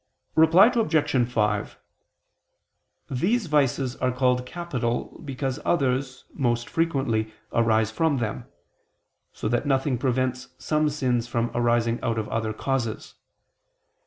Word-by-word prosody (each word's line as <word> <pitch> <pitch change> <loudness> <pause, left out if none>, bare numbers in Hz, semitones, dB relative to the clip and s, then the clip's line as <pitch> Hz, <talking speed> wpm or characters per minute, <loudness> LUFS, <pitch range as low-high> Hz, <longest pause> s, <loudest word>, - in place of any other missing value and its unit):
Reply 160 +5 +7
Obj. 150 - +1
5: 105 -3 0 1.3
These 200 - +1
vices 135 -4 +1
are 130 0 0
called 125 0 +1
capital 125 -8 -3
because 135 -2 -3
others, 130 -4 0
most 120 -4 0
frequently, 135 -10 0 0.2
arise 110 -2 +2
from 155 +4 +1
them: 115 -4 -3 0.9
so - - -4
that 120 +5 0
nothing 135 -2 +1
prevents 130 0 -1
some 155 -1 +1
sins 125 -5 -1
from 120 0 -1
arising 120 -1 +1
out 115 -2 -1
of 110 -1 -2
other 110 -1 -1
causes. 115 0 -3
125 Hz, 115 wpm, -25 LUFS, 120-145 Hz, 1.3 s, Reply